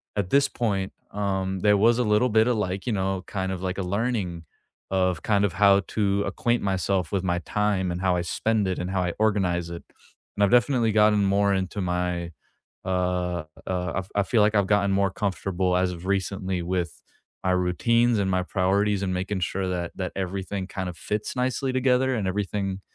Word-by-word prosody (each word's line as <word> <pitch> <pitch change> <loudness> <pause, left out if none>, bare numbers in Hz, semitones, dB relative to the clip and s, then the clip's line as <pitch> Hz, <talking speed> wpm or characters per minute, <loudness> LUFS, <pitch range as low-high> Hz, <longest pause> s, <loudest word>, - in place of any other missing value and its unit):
At 100 -3 -1
this 140 +5 +4
point, 100 -5 -2 0.2
um, 95 -2 -2
there 105 +1 +5
was 115 +3 +4
a 125 - +2
little 105 +3 +3
bit 110 +1 +4
of, 125 - +2
like, 95 -1 -2
you 120 - 0
know, 95 -1 -1
kind 95 -2 -3
of 95 -1 -4
like, 95 +1 -2
a - - 0
learning 100 -3 -2 0.5
of 90 -4 +1
kind 100 -2 +2
of 100 -4 +1
how 100 +1 +5
to 100 -2 0
acquaint 120 0 0
myself 95 -2 0
with 95 -2 0
my 90 -1 0
time 100 0 0
and 85 - -4
how 90 -1 +2
I 90 - 0
spend 105 +4 0
it 95 - -1
and 90 +1 -3
how 95 - 0
I 90 -1 -1
organize 95 -6 +1
it. 85 - -7 0.5
And 100 - +2
I've 100 - +3
definitely 120 -2 +3
gotten 105 -1 +4
more 100 +1 +2
into 95 +1 -2
my, 90 -1 -2 0.6
uh, 90 -2 -1 0.2
uh 90 0 -2
I - - +4
I - - +3
feel, 110 +3 +1
like, 105 +1 +3
I've 100 -2 +3
gotten 100 -1 +2
more 100 -1 +2
comfortable 95 -2 -1
as 90 0 +1
of 90 +1 -8
recently 95 -2 -1
with 90 0 -3 0.4
my 95 - +2
routines 115 +6 +2
and 100 -1 +1
my 95 0 +1
priorities 100 +2 +1
and 95 -1 -1
making 95 +2 -2
sure 95 +2 -2
that 90 -2 -3
that 90 -2 -3
everything 95 0 -3
kinda 95 -2 -4
fits 105 +7 -4
nicely 130 +1 0
together 130 0 +2
and 105 -5 -1
everything 95 0 -2
95 Hz, 200 wpm, -25 LUFS, 90-105 Hz, 0.6 s, there